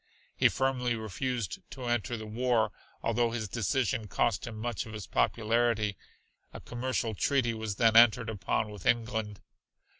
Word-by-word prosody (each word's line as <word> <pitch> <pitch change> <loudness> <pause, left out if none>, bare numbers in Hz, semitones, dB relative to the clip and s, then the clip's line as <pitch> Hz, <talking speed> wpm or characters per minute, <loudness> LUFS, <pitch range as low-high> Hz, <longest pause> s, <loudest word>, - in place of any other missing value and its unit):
He - - +5
firmly 125 -2 0
refused 115 0 -3
to 130 - -8
enter 120 0 -1
the 110 - -7
war 115 +1 +1 0.3
although 115 +1 +2
his 115 -2 -3
decision 110 +1 0
cost 115 +5 0
him 110 -2 -6
much 115 0 -3
of 110 - -9
his 105 -3 -6
popularity. 115 -2 +1 0.6
A - - -7
commercial 120 -2 -2
treaty 120 +2 +1
was 110 -2 -4
then 110 +1 +3
entered 115 0 +6
upon 105 0 -1
with 105 -4 -7
England. 110 -3 0
115 Hz, 150 wpm, -30 LUFS, 110-120 Hz, 0.6 s, entered